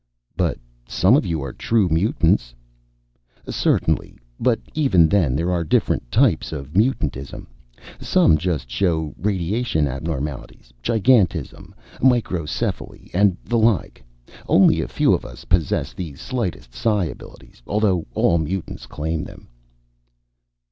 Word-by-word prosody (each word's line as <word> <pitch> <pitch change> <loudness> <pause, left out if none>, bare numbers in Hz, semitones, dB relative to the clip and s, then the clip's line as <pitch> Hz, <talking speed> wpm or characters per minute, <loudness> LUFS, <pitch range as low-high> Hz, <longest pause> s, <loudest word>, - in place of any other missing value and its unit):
"But 85 -3 0 0.3
some 95 +8 +3
of 140 - +1
you 80 -4 -2
are 70 - -6
true 110 -4 +1
mutants?" 80 - +1 0.9
"Certainly. - - 0 0.2
But 120 -1 +2
even 130 - +4
then, 80 -9 +2
there 85 +4 0
are 85 -1 0
different - - 0
types - - +2
of 75 0 -7
mutantism. 85 - -1 0.5
Some 75 -2 +3
just 80 -7 -2
show 80 0 -1
radiation 95 -2 -1
abnormalities 70 -3 -5
giantism, 110 - +1 0.3
microcephaly, 100 - -1
and 95 0 +3
the 120 -1 +1
like. 110 - +1 0.5
Only - - +5
a - - -3
few - - +2
of - - 0
us - - -11
possess 85 -5 0
the 85 -6 -6
slightest 95 - -4
psi 105 -5 +1
abilities 75 - -11
although 100 -5 +1
all 85 - +3
mutants 80 +3 -4
claim 80 +1 -3
them." - - -12
85 Hz, 120 wpm, -21 LUFS, 75-105 Hz, 0.9 s, Only